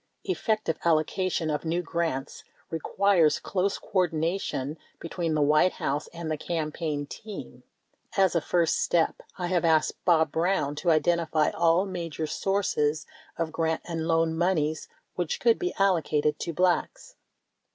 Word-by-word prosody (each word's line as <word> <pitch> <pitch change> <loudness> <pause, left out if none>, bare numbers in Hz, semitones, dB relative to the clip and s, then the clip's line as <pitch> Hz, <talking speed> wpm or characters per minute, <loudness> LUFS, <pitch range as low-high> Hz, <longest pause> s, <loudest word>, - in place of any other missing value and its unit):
Effective 215 - -1
allocation 165 +1 +1
of 150 - -2
new 170 +2 -1
grants 165 -5 -3 0.3
requires 165 -1 +2
close 195 +4 -1
coordina 175 -1 0
tion 145 +4 -4 0.2
between 165 -1 -2
the 150 - +3
White 155 +5 +4
House 145 +2 -2
and 170 -2 -6
the 155 - -2
Campaign 155 -3 -3
team. 210 +8 -9 0.6
As 190 -2 +4
a 170 - +2
first 170 +1 +1
step, 170 -2 +1 0.2
I 180 - -2
have 175 -1 +1
asked 160 -2 +2
Bob 160 -4 +3
Brown 165 -4 +1
to 175 - 0
identify 160 -1 +2
all 170 +3 +3
major 170 -5 -4
sources 155 -4 0 0.3
of 165 -1 -2
grant 160 0 -1
and 165 -2 -3
loan 165 -1 +2
moneys 160 -3 0 0.3
which 175 -3 -2
could 230 -1 +3
be 360 0 -2
allocated 160 -6 +2
to 170 - -3
Blacks. 185 - 0
165 Hz, 140 wpm, -27 LUFS, 155-180 Hz, 0.6 s, White